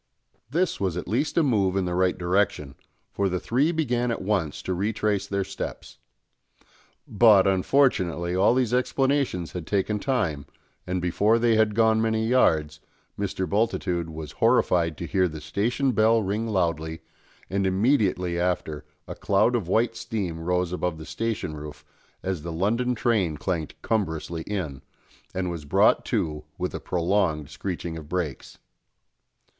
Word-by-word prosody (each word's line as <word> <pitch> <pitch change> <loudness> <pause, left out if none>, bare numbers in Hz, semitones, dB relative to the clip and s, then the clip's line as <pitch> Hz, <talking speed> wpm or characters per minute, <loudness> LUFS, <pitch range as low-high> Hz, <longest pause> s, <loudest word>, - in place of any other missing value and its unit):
This 175 +6 0
was 95 -3 -1
at 90 - -5
least 130 - -1
a 170 - +5
move 100 -9 +2
in 95 - +1
the 90 - -2
right 90 0 +1
direction; 90 -6 0 0.4
for 100 -1 0
the 90 0 -1
three 135 - +1
began 125 -7 0
at 115 - -2
once 95 -7 -1
to 95 - -2
retrace 105 +1 -1
their 100 -1 -1
steps. 95 +1 -7 1.1
But, 105 -3 +6
unfortunately, 95 -4 +2
all 100 +6 +4
these 125 -3 +1
explanations 130 - 0
had 85 -3 -6
taken 105 +1 0
time, 95 - -1 0.4
and 90 -1 -2
before 105 +6 +3
they 115 0 +3
had 110 -1 +2
gone 110 -1 +4
many 110 0 +1
yards, 80 -11 +2 0.4
Mr. 95 -2 -2
Bultitude 90 -4 0
was 80 -1 -7
horrified 80 -3 +2
to 85 - -5
hear 95 +1 +2
the 80 -2 -7
station 120 - 0
bell 110 0 +3
ring 105 +4 -2
loudly, 85 -5 -1 0.5
and 95 0 0
immediately 95 -4 +1
after 85 -4 -1 0.2
a - - -5
cloud 105 +5 +2
of 105 -8 -1
white 115 +5 +1
steam 100 -9 -4
rose 90 +1 -1
above 90 -2 -2
the 80 - -9
station 110 -5 -3
roof 75 0 -9 0.4
as 95 -4 -2
the 85 +2 -5
London 115 +9 0
train 105 -9 +1
clanked 85 -2 -3
cumbrously 85 -6 -1
in, 80 -10 -4 0.5
and 90 -1 -1
was 85 -3 -6
brought 70 - +3
to 75 -1 -1
with 90 0 -3
a - - -4
prolonged 85 -4 0
screeching 85 +1 -4
of 75 -2 -10
brakes. 85 -6 -4
95 Hz, 155 wpm, -25 LUFS, 85-110 Hz, 1.1 s, But